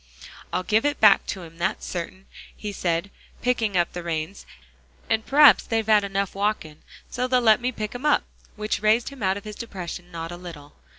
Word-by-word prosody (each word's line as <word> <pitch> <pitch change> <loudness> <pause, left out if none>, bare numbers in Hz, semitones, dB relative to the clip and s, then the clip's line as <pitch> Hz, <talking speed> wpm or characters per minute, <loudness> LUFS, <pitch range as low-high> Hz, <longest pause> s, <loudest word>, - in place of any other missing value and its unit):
"Ill 185 - -1
give 215 +3 +2
it 290 0 0
back 210 -2 +6
to 190 - -4
him, 165 0 -13
that's 175 +2 -1
cert'in," 185 +2 -6 0.3
he 210 - -5
said, 175 0 -2 0.3
picking 225 -6 +1
up 175 -1 +1
the 175 - -5
reins, 170 +2 -4 0.6
"and 220 0 +1
p'raps 280 -7 +7
they've 225 -1 -1
had 215 -1 +4
enough 195 -1 -2
walkin' 200 -7 -2 0.3
so 250 - -1
they'll 255 0 +3
let 225 -1 +4
me 250 +1 0
pick 215 -3 -5
'em 245 +2 -7
up," 295 - +3 0.3
which 210 0 -2
raised 220 +2 +3
him 275 -3 -13
out 190 0 +1
of 200 - -9
his 210 -1 -8
depression 180 -5 -7
not 165 0 -6
a 175 - -7
little. 165 -5 -11
200 Hz, 200 wpm, -24 LUFS, 175-225 Hz, 0.6 s, p'raps